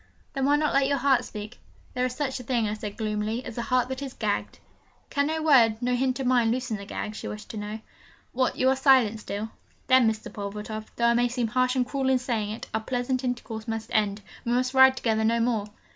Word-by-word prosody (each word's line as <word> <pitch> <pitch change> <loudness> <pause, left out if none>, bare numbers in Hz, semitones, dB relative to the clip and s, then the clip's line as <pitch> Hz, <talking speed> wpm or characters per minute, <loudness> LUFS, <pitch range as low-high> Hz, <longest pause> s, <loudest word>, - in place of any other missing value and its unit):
'Then 270 -1 0
why 285 +1 +4
not 300 0 +1
let 275 0 +3
your 280 0 +1
heart 270 -1 +3
speak?' 210 -1 -8 0.3
'There 250 0 +1
is 250 - -7
such 265 -2 -2
a - - -8
thing,' 235 -2 0
I 210 - -2
said 210 -1 -6
gloomily, 215 +2 -2
'as 240 - -7
a 235 - -2
heart 250 +1 +1
that 260 +1 -4
is 270 -2 -5
gagged.' 210 -2 -2 0.5
'Can 285 0 +1
no 315 0 -2
word, 235 -8 +5
no 250 +1 0
hint 255 +1 0
of 265 - -2
mine 245 -2 +3
loosen 245 -2 -1
the 200 0 -9
gag?' 210 - -4
she - - -6
wished 210 0 -7
to 220 - -7
know. 210 +1 -5 0.5
'What, 255 0 +1
you 260 - +1
are 265 - +3
silent 260 -5 +4
still? 210 +1 -5 0.3
Then, 255 -3 +5
Mr. 220 0 -5
Pulvertoft, 210 +2 -6
though 235 - +1
I - - +4
may 240 +1 +3
seem 240 -1 -2
harsh 255 +2 +1
and 255 -1 +2
cruel 265 +1 -1
in 260 - +4
saying 230 -4 -2
it, 215 - -6
our 220 - 0
pleasant 250 +2 -2
intercourse 240 -3 -4
must 225 0 -4
end 210 -1 +1 0.2
we 240 - -1
must 255 +1 +1
ride 265 0 +7
together 220 -3 +1
no 230 +1 +2
more!' 230 -3 0
240 Hz, 240 wpm, -26 LUFS, 220-260 Hz, 0.5 s, ride